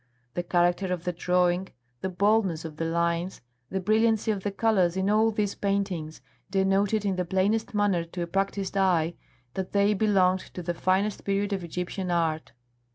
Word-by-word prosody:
The 175 - -1
character 175 +2 +1
of 180 -2 -2
the 180 -1 -2
drawing, 180 +1 +1 0.3
the 190 - -1
boldness 190 -3 +1
of 155 -2 -7
the 165 - -2
lines, 170 +2 -1 0.3
the 190 - -2
brilliancy 220 +3 +2
of 200 -2 -2
the 205 - -1
colours 195 -4 +2
in 190 +2 +1
all 220 +1 +4
these 210 -2 -1
paintings 195 -6 -2 0.3
denoted 195 +2 +1
in 195 -2 0
the 180 - +1
plainest 200 +5 0
manner 205 -4 +2
to 175 +1 -5
a - - -2
practised 195 +2 -2
eye 175 -4 +2 0.4
that 190 -1 -4
they 200 +1 +4
belonged 190 -3 +3 0.2
to 180 - -5
the 175 - -1
finest 190 +4 0
period 200 +1 0
of 190 -2 -2
Egyptian 180 +2 -4
art. 165 -2 0
190 Hz, 175 wpm, -27 LUFS, 175-200 Hz, 0.4 s, all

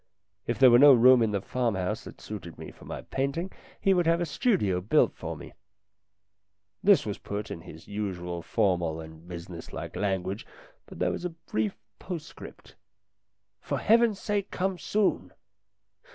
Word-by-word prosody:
If 120 - -1
there 130 -2 +7
were 120 - +7
no 145 0 +9
room 125 +1 +7
in 110 - +3
the 100 -2 -2
farmhouse 110 -4 -1
that - - -11
suited 95 -6 -8
me - - -8
for - - -16
my - - -6
painting 140 +8 -2 0.3
he 195 - +3
would 175 -3 +2
have 165 +1 +3
a 175 - 0
studio 145 - +1
built 100 - +3
for - - -6
me. - - -11 1.3
This 200 -2 +5
was 105 -2 -4
put 100 +1 -5
in 85 - -6
his 80 -2 -12
usual 90 -4 -4
formal 85 -5 0
and 80 +1 -11
business 85 -1 -8
like - - -6
language, 95 0 -2 0.4
but - - -11
there - - +1
was - - -5
a 180 - -1
brief 110 - -3 0.2
postscript 170 -4 -9 0.8
"For - - -3
Heaven's 225 -2 +3
sake 205 -1 -1
come 190 -1 -2
soon 210 +2 0
110 Hz, 165 wpm, -28 LUFS, -, 1.3 s, no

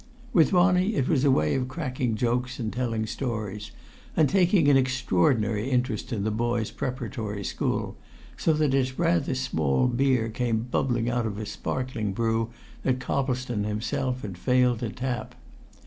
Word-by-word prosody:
With 160 -5 +5
Ronnie, 180 +3 +3
it 130 - +1
was 140 -5 +2
a 145 - +4
way 75 - +3
of 130 -1 0
cracking 130 -4 -2
jokes 125 +2 -1
and 110 -3 -3
telling 115 -3 -1
stories, 105 -4 -4 0.5
and 155 - +5
taking 180 -1 +3
an 145 - +6
extraordinary 115 -3 +2
interest 125 -3 -1
in 105 -4 -1
the 110 - 0
boy's 115 0 -1
preparatory 115 -5 -4
school, - - -2 0.4
so 165 - +1
that 150 -3 +1
its 130 -1 +1
rather 165 -5 +1
small 80 - +1
beer 125 -2 +2
came 115 -1 0
bubbling 120 -1 0
out 120 -1 0
in 105 -2 -5
a 110 - -4
sparkling 115 -3 -3
brew 115 +1 0 0.3
that 130 -1 +1
Coplestone 125 -4 -1
himself 125 +5 -2
had 95 -4 -6
failed 125 -1 +3
to 115 - -2
tap. 125 +2 -4
125 Hz, 160 wpm, -26 LUFS, 110-130 Hz, 0.5 s, an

